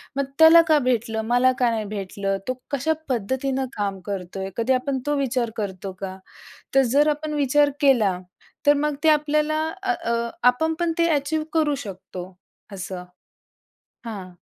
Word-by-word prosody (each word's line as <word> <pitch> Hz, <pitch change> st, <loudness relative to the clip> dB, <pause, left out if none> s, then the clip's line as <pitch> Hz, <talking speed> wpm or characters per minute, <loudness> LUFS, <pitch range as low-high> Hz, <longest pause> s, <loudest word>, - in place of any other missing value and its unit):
मग 280 Hz, -, +1 dB, 0.2 s
त्याला 320 Hz, +1 st, +9 dB
का 310 Hz, -, +5 dB
भेटलं? 225 Hz, -3 st, 0 dB
मला 245 Hz, +2 st, +4 dB
का 245 Hz, -2 st, +3 dB
नाही 220 Hz, -2 st, -2 dB
भेटलं? 195 Hz, -1 st, -3 dB
तो 255 Hz, -, 0 dB, 0.2 s
कशा 280 Hz, +3 st, +1 dB, 0.2 s
पद्धतीनं 260 Hz, +3 st, -1 dB
काम 200 Hz, -2 st, -2 dB
करतोय? 190 Hz, -1 st, -5 dB
कधी 235 Hz, +3 st, +2 dB
आपण 260 Hz, +1 st, -1 dB
तो 295 Hz, -, +1 dB
विचार 250 Hz, -3 st, 0 dB
करतो 195 Hz, -2 st, -4 dB
का? 190 Hz, -1 st, -5 dB, 0.6 s
तर 270 Hz, -, +7 dB
जर 290 Hz, +3 st, +4 dB
आपण 300 Hz, +1 st, -2 dB
विचार 290 Hz, 0 st, +3 dB
केला, 225 Hz, -10 st, +3 dB, 0.5 s
तर 290 Hz, -, +7 dB
मग 300 Hz, -1 st, 0 dB
ते 320 Hz, -, +5 dB
आपल्याला 300 Hz, 0 st, +2 dB, 0.3 s
आ 380 Hz, -1 st, +1 dB
अ 235 Hz, -6 st, -2 dB, 0.2 s
आपण 320 Hz, +6 st, +3 dB
पण 345 Hz, -1 st, +1 dB
ते 335 Hz, 0 st, +3 dB
ॲचीव 295 Hz, +2 st, 0 dB
करू 305 Hz, -3 st, +2 dB
शकतो, 185 Hz, -1 st, -8 dB, 0.4 s
असं. 185 Hz, -1 st, -6 dB, 1.0 s
हां. 195 Hz, -5 st, -7 dB
255 Hz, 160 wpm, -23 LUFS, 200-295 Hz, 1.0 s, त्याला